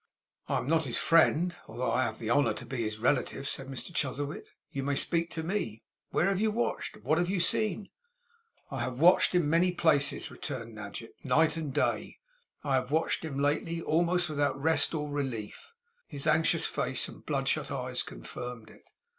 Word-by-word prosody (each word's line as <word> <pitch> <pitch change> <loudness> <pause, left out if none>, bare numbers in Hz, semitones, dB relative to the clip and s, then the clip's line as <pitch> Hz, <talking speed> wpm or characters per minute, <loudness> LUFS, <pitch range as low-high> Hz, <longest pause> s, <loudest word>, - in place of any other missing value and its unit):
'I - - +2
am - - -3
not 160 0 +2
his 120 - -2
friend, 165 +1 +4
although 120 +3 -2
I 130 - +2
have 110 -1 -4
the 115 0 -3
honour 145 +2 +3
to 130 - -7
be 130 +2 -5
his 110 -2 -2
relative,' 130 +3 0
said 135 -1 -3
Mr 135 +6 -6
Chuzzlewit. 145 -1 -2 0.2
'You 135 - -3
may 140 +1 0
speak 170 +3 +1
to 160 - -4
me. 160 - -3 0.3
Where 165 - +2
have 195 0 0
you 220 - +3
watched, 230 +3 -2
and - - -17
what 155 +5 +3
have 175 0 0
you 195 -1 0
seen?' 200 +3 +1 0.9
'I 135 - -3
have 125 +1 -3
watched 180 +2 +5
in 175 -4 +3
many 170 +4 +3
places,' 155 -5 +2
returned 115 -6 -6
Nadgett, 105 +2 -8
'night 155 +5 +3
and 155 -4 -3
day. - - -1 0.5
I 140 - 0
have 130 -1 +1
watched 160 +3 +1
him 150 -4 -4
lately, 150 +4 0
almost 175 +2 +2
without 145 -3 0
rest 160 +2 +3
or 150 -1 -2
relief;' 135 - -4 0.4
his 140 -2 -2
anxious 160 +1 +3
face - - -1
and - - -12
bloodshot - - 0
eyes - - -2
confirmed 115 - -8
it. - - -20
145 Hz, 190 wpm, -30 LUFS, 125-165 Hz, 0.9 s, watched